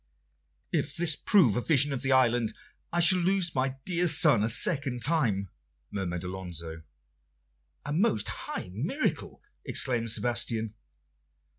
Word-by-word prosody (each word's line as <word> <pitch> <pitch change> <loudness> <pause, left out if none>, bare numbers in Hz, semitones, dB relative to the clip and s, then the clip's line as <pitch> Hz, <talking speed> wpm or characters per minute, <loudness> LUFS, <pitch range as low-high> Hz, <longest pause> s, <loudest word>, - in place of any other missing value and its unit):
"If - - -2
this 165 -3 +3
prove 155 - +3
a - - -1
vision 145 0 +3
of 135 - -3
the 135 - -1
island, 120 -3 +2 0.4
I 175 - -1
shall 175 +2 +6
lose 180 -1 0
my 130 0 -1
dear 180 -1 0
son 145 -8 +4
a 110 - 0
second 135 -1 +1
time," 115 - 0 0.4
murmured 90 -4 -4
Alonso. 85 -3 -6 1.0
"A 145 - -4
most 155 - 0
high 90 - -6
miracle!" 165 - -3 0.2
exclaimed 120 -3 0
Sebastian. 115 -1 -1
130 Hz, 130 wpm, -27 LUFS, 105-165 Hz, 1.0 s, shall